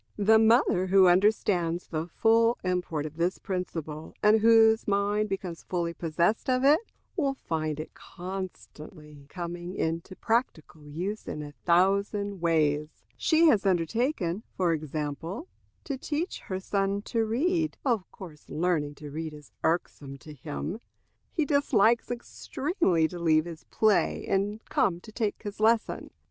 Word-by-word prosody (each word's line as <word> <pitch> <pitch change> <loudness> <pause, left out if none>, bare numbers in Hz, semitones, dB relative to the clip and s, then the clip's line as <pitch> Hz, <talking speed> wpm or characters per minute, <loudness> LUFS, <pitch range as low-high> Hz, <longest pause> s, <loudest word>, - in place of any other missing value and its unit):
The 220 +2 +5
mother 220 -5 +4
who 190 0 +6
understands 180 -2 +2
the 160 0 -4
full 230 +6 +3
import 180 -5 -1
of 155 +1 -8
this 175 +2 0
principle, 165 -5 -5
and 215 +1 +6
whose 225 0 +5
mind 205 +1 +1
becomes 190 -3 -4
fully 170 -2 -2
possessed 170 +9 0
of 255 0 +2
it, 290 +3 +6 0.4
will 280 -6 0
find 155 - -3
it 155 - -7
constantly 155 -5 -9
coming 175 +1 -6
into 165 +3 -3
practical 165 - -2
use 180 +8 -4
in 150 - -4
a 145 - -8
thousand 200 +4 +1
ways. 155 -2 0
She 325 +1 +3
has 210 -9 +3
undertaken, 195 - 0 0.2
for 175 -3 +2
example, 155 - -4 0.4
to 275 -4 -4
teach 315 +6 -3
her 190 - -6
little 190 - -7
son 200 0 0
to 230 0 0
read. 315 +9 0
Of 230 -8 0
course 160 -6 -12
learning 155 -3 0
to 145 0 -9
read 155 0 -5
is 150 -1 -15
irksome 150 -4 -2
to 155 +3 -12
him. 155 - -5 0.5
He 315 - 0
dislikes 240 -6 +3
extremely 245 - -1
to 175 +1 -8
leave 155 -2 +3
his 165 -2 -9
play 215 -2 +1
and 205 +3 -1
come 175 -3 +1
to 215 - -13
take 215 -2 -2
his 205 -1 -6
lesson. 225 +1 +1
185 Hz, 145 wpm, -28 LUFS, 160-220 Hz, 0.5 s, who